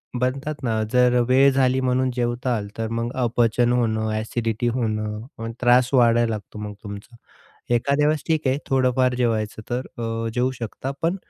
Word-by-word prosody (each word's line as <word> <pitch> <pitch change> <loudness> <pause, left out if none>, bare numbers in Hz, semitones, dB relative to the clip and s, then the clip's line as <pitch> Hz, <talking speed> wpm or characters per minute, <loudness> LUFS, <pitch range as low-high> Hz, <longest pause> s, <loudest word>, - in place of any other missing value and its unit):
म्हणतात 135 +4 -2
ना, 110 -2 0
जर 125 -1 +4
वेळ 135 +2 +6
झाली 130 -1 +2
म्हणून 130 0 +1
जेवाताल 120 -3 -1
तर 115 0 -2
मग 115 +1 -2
अपचन 120 +1 +2
होणं, 110 -3 +1
ॲसिडिटी 115 +1 -2
होणं 110 -3 -1 0.2
आणि 115 0 -4
त्रास 125 +1 +4
वाढायला 120 -2 +4
लागतो 105 -1 -6
मग 105 0 -5
तुमचा. 100 +3 -9 0.6
एखाद्या 140 +5 +2
वेळेस 155 0 0
ठीक 160 -3 +1
आहे 130 +2 +2
थोडंफार 130 -1 +2
जेवायचं 110 -3 -1
तर 125 +1 -1 0.2
अ, 115 0 -3
जेवू 125 +1 +1
शकता, 120 +4 -4
पण 170 +3 +1
120 Hz, 160 wpm, -23 LUFS, 115-130 Hz, 0.6 s, वेळ